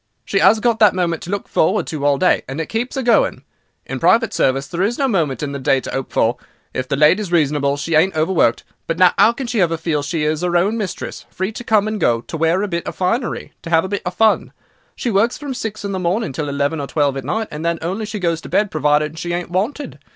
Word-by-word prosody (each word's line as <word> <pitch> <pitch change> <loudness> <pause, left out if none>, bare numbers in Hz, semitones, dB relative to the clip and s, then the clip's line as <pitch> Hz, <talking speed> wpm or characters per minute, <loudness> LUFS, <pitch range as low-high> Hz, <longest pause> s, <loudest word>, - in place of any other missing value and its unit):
She 195 - 0
'as 220 - +5
got 230 -1 +1
that 210 -4 +5
moment 170 -3 -1
to - - -8
look 200 +1 -3
forward 185 +7 +1
to 150 -3 -5
all 145 -1 +3
day, 180 - +3
and 135 +3 -5
it 160 - -3
keeps 240 +4 -3
'er 265 - -1
going. 235 -2 +2 0.4
In - - -5
private 230 0 +3
service 135 +1 +1
there's 190 +10 -1
no 275 - +1
moment 155 - 0
in 145 - -3
the 140 - -5
day 135 0 +2
to - - -7
'ope 135 -1 -4
for. 120 +2 +1 0.4
If 130 0 -3
the 140 - 0
lady 150 +8 +4
is 195 -5 -5
reasonable 145 -4 +1
she 165 +3 -3
ain't 160 +3 +3
overworked; 155 -6 +2 0.2
but 165 - -1
no 180 -1 +6
'ow 225 - +7
can 260 +3 -6
she 230 -3 0
ever 165 -2 +1
feel 160 -2 -1
she 150 +2 -2
is 155 +1 0
her 175 -1 +1
own 200 +6 +1
mistress, 205 -5 -5
free 190 +3 -3
to 230 - -8
come 215 -3 +2
and 215 -1 -3
go, 115 -6 +2
to 140 - -8
wear 165 +3 +2
'er - - -1
bit 170 -3 -3
of - - -5
finery, 230 +7 -2
to 165 - -8
'ave 165 +2 +4
'er - - -5
bit 200 0 -2
of 180 0 -4
fun. 220 -1 +2 0.4
She 240 - -2
works 220 +4 +2
from 285 -3 -5
six 215 -4 -5
in 200 - -3
the 190 - -2
morning 180 - -1
till 145 +2 -3
eleven 140 +2 -1
or 140 - -4
twelve 145 -2 0
at 135 - -4
night, 220 - -2
and 150 +1 -6
then 170 0 0
she - - -12
only 195 +6 -2
goes 175 -7 -2
to - - -10
bed 210 -1 +1
provided 150 +1 +1
she 175 +1 -3
ain't 175 0 -4
wanted. 225 +11 -2
175 Hz, 265 wpm, -19 LUFS, 150-210 Hz, 0.4 s, ow